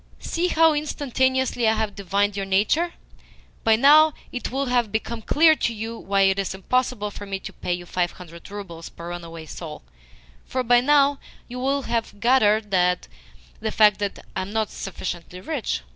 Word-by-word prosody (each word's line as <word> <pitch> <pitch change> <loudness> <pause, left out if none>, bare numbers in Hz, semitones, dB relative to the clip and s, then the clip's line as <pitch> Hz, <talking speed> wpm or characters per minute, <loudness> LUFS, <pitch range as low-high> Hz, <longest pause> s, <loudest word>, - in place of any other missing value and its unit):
"See 345 +2 -1
how 325 -2 +4
instantaneously 260 -4 0
I 220 - +4
have 215 -2 -1
divined 200 +1 0
your 195 -1 -3
nature! 220 - +2 0.7
By 225 -1 +5
now 300 +5 +6 0.2
it 245 - -4
will 270 +3 -1
have 245 -4 +1
become 225 +1 -3
clear 315 +8 +5
to 235 - 0
you 225 +2 -5
why 200 -3 0
it 195 0 +3
is 195 -1 -2
impossible 230 +1 -1
for 205 0 -9
me 195 0 -3
to - - -8
pay 180 - -3
you 175 0 -9
five 175 0 -1
hundred 170 -2 -12
roubles 185 -5 -8
per 170 +1 -9
runaway 165 -2 -7
soul: 145 - -8 0.6
for 255 0 -2
by 245 0 +5
now 285 +1 +4 0.3
you 250 +1 -7
will 275 +2 0
have 230 -3 -3
gathered 215 -3 +3
the 65 - -2
fact 210 -2 +5
that 205 -1 -4
I 190 - -1
am 190 +2 -6
not 220 -1 -1
sufficiently 180 -1 -6
rich. 240 - -3
215 Hz, 175 wpm, -23 LUFS, 190-260 Hz, 0.7 s, now